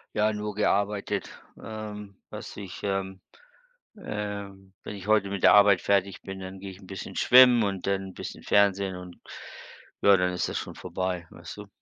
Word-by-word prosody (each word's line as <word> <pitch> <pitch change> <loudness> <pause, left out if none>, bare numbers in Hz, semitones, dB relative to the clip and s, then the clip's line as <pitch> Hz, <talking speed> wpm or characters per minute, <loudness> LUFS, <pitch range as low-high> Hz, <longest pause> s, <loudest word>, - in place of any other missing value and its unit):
Ja, 105 +1 +2
nur 105 0 -4
gearbeitet, 100 -1 0 0.3
ähm, 105 -2 -8
dass - - -8
ich, 95 -3 -8
ähm 95 -1 -3 0.7
ähm 100 - -6
wenn - - -7
ich 95 -2 -9
heute 105 -2 +3
mit 100 -1 -4
der - - +8
Arbeit 100 -2 +6
fertig 100 -1 +1
bin, 95 0 -7
dann 95 0 -8
gehe 95 0 -7
ich 95 - -14
'n 95 - -15
bisschen 95 -1 -8
schwimmen 125 -1 +7
und 95 -3 -2
dann 95 -1 -1
'n - - -12
bisschen - - -7
Fernsehen 100 -2 +2
und 90 -1 -10 0.8
ja, 100 -1 +6
dann 90 0 0
ist 90 - -1
das - - -3
schon - - -5
vorbei, 90 -1 -4
weißt - - -11
du? 105 -1 -9
100 Hz, 185 wpm, -27 LUFS, 95-105 Hz, 0.8 s, der